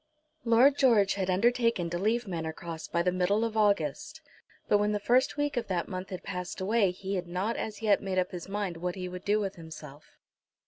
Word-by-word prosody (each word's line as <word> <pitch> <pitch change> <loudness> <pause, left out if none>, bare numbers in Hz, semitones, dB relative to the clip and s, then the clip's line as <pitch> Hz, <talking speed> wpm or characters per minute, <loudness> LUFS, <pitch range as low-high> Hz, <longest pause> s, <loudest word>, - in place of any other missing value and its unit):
Lord 255 +5 +5
George 220 -7 +4
had 190 -2 -2
undertaken 230 -2 +2
to 175 - -2
leave 225 +4 0
Manor 165 -3 -3
Cross 165 -1 -7
by 170 - 0
the 180 - +2
middle 185 +4 +1
of 225 -1 -4
August, 205 - 0 0.5
but 205 - +4
when 210 0 +1
the 210 - 0
first 250 +7 +2
week 290 -1 0
of 240 - -1
that 180 -3 -1
month 185 -1 -6
had 185 - -6
passed 180 -1 -5
away 200 +1 +2
he 190 +2 -4
had 175 -1 -4
not 185 +6 -2
as 220 0 -5
yet 210 -2 +3
made 190 -1 -3
up 185 - +1
his 180 +1 -7
mind 200 -4 -3
what 180 +1 -3
he 185 -1 -5
would 180 +1 -7
do 210 +1 +2
with 195 -3 -3
himself. 155 -3 -11
195 Hz, 220 wpm, -29 LUFS, 180-220 Hz, 0.5 s, Lord